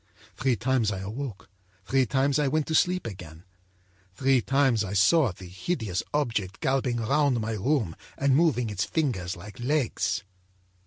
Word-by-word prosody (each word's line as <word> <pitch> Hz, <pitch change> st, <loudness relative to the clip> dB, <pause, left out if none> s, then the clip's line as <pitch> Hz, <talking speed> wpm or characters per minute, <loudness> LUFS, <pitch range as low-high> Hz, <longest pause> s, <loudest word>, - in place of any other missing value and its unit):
Three 135 Hz, -2 st, +1 dB
times 120 Hz, -2 st, +1 dB
I 95 Hz, -1 st, -4 dB
awoke, 110 Hz, +1 st, -6 dB, 0.4 s
three 130 Hz, +2 st, +2 dB
times 135 Hz, +4 st, +2 dB
I 145 Hz, -, +2 dB
went 155 Hz, +2 st, +1 dB
to 160 Hz, -, -3 dB
sleep 180 Hz, +3 st, +2 dB
again; 90 Hz, -6 st, -8 dB, 0.7 s
three 135 Hz, +3 st, +3 dB
times 135 Hz, -4 st, +2 dB
I 100 Hz, -1 st, -4 dB
saw 115 Hz, -, +4 dB
the 95 Hz, +2 st, -12 dB
hideous 95 Hz, -, -3 dB
object 110 Hz, -10 st, -1 dB
galloping 130 Hz, -2 st, 0 dB
round 135 Hz, +2 st, +2 dB
my 110 Hz, 0 st, -2 dB
room 110 Hz, -, 0 dB, 0.2 s
and 140 Hz, -1 st, +3 dB
moving 135 Hz, -8 st, +2 dB
its 100 Hz, -1 st, -1 dB
fingers 115 Hz, -, -1 dB
like 95 Hz, +3 st, -11 dB
legs. 130 Hz, -4 st, 0 dB
125 Hz, 155 wpm, -27 LUFS, 100-140 Hz, 0.7 s, saw